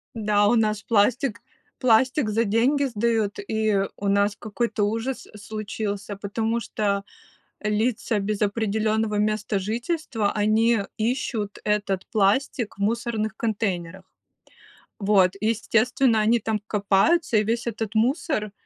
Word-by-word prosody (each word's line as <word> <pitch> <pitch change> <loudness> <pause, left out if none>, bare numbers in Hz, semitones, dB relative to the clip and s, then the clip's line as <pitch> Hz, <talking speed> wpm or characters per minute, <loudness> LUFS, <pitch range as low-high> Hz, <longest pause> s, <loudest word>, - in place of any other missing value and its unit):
Да, 210 -2 +2
у 240 - +4
нас 215 -2 +1
пластик 230 +2 +1 0.4
пластик 255 +1 +3
за 225 +2 +1
деньги 255 +7 +2
сдают, 225 -3 0
и 215 -2 +1 0.2
у 200 - -3
нас 200 +1 +2
какой-то 220 0 -2
ужас 230 +4 -3
случился, 210 -1 -5
потому 220 +3 -2
что 200 -1 -1 0.6
лица 215 +1 0
без 205 +1 -2
определенного 215 0 0
места 215 -1 0
жительства, 230 - -2
они 220 +2 +3 0.2
ищут 225 -3 -2
этот 205 -3 -1
пластик 220 +2 +1
в - - -11
мусорных 220 0 -1
контейнерах. 190 -5 -2 0.9
Вот, 195 -3 +3
естественно, 230 +2 +2
они 225 +3 +3
там 220 -1 -2
копаются, 210 - +2
и 210 - +2
весь 230 +2 -1
этот 225 -2 -3
мусор 230 - 0
215 Hz, 120 wpm, -24 LUFS, 205-230 Hz, 0.9 s, у